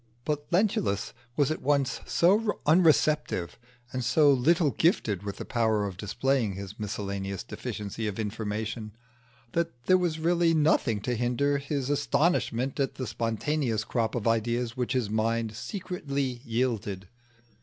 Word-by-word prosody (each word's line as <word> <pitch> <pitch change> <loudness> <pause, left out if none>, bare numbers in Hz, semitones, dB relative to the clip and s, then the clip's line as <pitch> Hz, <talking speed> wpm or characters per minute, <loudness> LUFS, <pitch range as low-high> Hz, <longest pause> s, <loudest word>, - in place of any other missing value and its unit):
But 150 -1 -2
Lentulus 170 - +1 0.2
was 145 -1 +3
at 155 - -3
once 140 -2 +1
so 205 +5 +3
unreceptive, 155 - +3 0.3
and 130 -1 -2
so 145 +4 +5
little 150 +4 +3
gifted 115 - +1
with 100 -1 -5
the - - -6
power 110 -3 +1
of 100 -2 -4
displaying 115 +3 0
his 100 +1 -8
miscellaneous 100 -2 -4
deficiency 110 -2 -5
of 105 - -4
information, 110 0 -3 0.6
that 165 -8 -2
there 185 0 +5
was 170 -3 0
really 170 0 +2
nothing 140 -8 +2
to 125 - -1
hinder 125 +4 +1
his 140 -1 -2
astonishment 145 -3 +1
at 135 - 0
the 130 - -4
spontaneous 115 +2 -1
crop 115 -1 -1
of 120 -2 -1
ideas 115 +1 0
which 125 0 -1
his 120 -5 0
mind 110 0 0
secretly 140 - -3
yielded. 110 -5 -1
125 Hz, 140 wpm, -28 LUFS, 110-145 Hz, 0.6 s, so